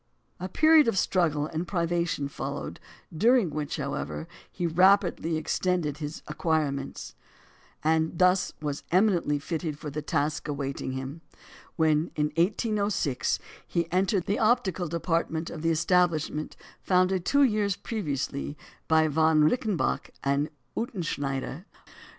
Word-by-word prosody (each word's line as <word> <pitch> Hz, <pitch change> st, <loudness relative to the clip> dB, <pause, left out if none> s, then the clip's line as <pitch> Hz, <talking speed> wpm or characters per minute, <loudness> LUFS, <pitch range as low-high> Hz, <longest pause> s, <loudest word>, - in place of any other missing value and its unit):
A 185 Hz, +1 st, -4 dB
period 310 Hz, -, +5 dB
of 230 Hz, -, +1 dB
struggle 160 Hz, -6 st, +1 dB
and 160 Hz, +3 st, -4 dB
privation 170 Hz, -4 st, 0 dB
followed, 140 Hz, -, -5 dB, 0.4 s
during 225 Hz, -1 st, +4 dB
which, 150 Hz, 0 st, -3 dB
however, 145 Hz, +2 st, -4 dB, 0.2 s
he 175 Hz, -, -3 dB
rapidly 175 Hz, -1 st, +3 dB
extended 155 Hz, -2 st, -1 dB
his 150 Hz, 0 st, -6 dB
acquirements; 150 Hz, -3 st, -2 dB, 0.7 s
and 160 Hz, +1 st, +1 dB
was 180 Hz, +1 st, +4 dB
thus 150 Hz, -2 st, -4 dB
eminently 180 Hz, -6 st, +3 dB
fitted 155 Hz, 0 st, -3 dB
for 150 Hz, -1 st, -6 dB
the 150 Hz, +2 st, -3 dB
task 150 Hz, 0 st, -1 dB
awaiting 140 Hz, -2 st, -3 dB
him, 135 Hz, +5 st, -6 dB, 0.5 s
when, 160 Hz, 0 st, +2 dB
in 150 Hz, 0 st, 0 dB
1806, 200 Hz, -, +1 dB, 0.3 s
he 170 Hz, -1 st, -1 dB
entered 190 Hz, 0 st, +1 dB
the 205 Hz, -, 0 dB
optical 215 Hz, -6 st, +2 dB
department 165 Hz, 0 st, -1 dB
of 155 Hz, -, -7 dB
the 165 Hz, -, +1 dB
establishment 165 Hz, -2 st, +1 dB, 0.2 s
founded 185 Hz, 0 st, +2 dB
two 280 Hz, +9 st, +4 dB
years 210 Hz, -6 st, +2 dB
previously 145 Hz, -, -3 dB, 0.3 s
by 160 Hz, 0 st, +4 dB
Von 155 Hz, 0 st, +3 dB
Reichenbach 205 Hz, -, 0 dB
and 140 Hz, +2 st, +1 dB, 0.3 s
Utzschneider. 155 Hz, -, -3 dB
165 Hz, 120 wpm, -27 LUFS, 150-185 Hz, 0.7 s, period